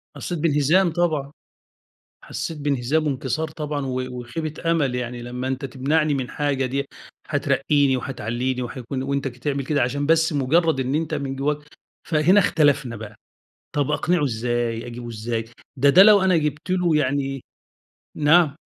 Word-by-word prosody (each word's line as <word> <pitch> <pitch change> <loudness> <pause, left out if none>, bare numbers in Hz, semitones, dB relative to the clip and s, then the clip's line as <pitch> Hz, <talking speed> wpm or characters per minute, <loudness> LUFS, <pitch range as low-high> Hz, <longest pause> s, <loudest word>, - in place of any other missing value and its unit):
حسّيت 175 -2 -4
بانهزام 165 +4 +3
طبعًا. 155 -5 0 0.9
حسّيت 165 - -5
بانهزام 145 +1 0
وانكسار 140 +3 -2
طبعًا 150 -2 -4
و 130 -1 -2 0.2
وخيبة 155 +6 -3
أمَل. 145 -7 +1
يعني 125 -1 -4
لمّا 125 +2 -5
أنت 135 +1 -3
تمنعني 145 +4 0
من 130 -3 -2
حاجة 140 -3 -1
دي 135 +2 -2 0.4
هترقِّيني 140 -1 +2
وهتعلِّيني 125 0 -3
وهيكون 130 +2 -5
وأنت 140 0 -1
ك 125 -1 -8
تعمل 140 0 -2
كده 145 0 +1
عشان 140 +4 0
بس 160 +1 +3
مُجرّد 155 +2 +2
إن 130 +2 -1
أنت 160 0 -2
من 140 -2 -3
جوّاك 145 +2 0 0.5
فهنا 165 +5 +4
اختلفنا 145 - +2
بقى. 110 -1 -9 0.6
طب 145 -2 +1
أقنِعُه 175 -2 +1
إزاي، 120 -1 -2
أجيبه 120 0 -7
إزاي. 115 0 -3 0.3
ده 140 +2 +4
ده 185 +7 +8
لو 210 -1 +7
أنا 185 -3 +3
جِبت 150 +2 -2
له 180 -3 +2
يعني 135 -2 0 0.7
نعم؟ 155 0 +4
140 Hz, 150 wpm, -23 LUFS, 130-155 Hz, 0.9 s, ده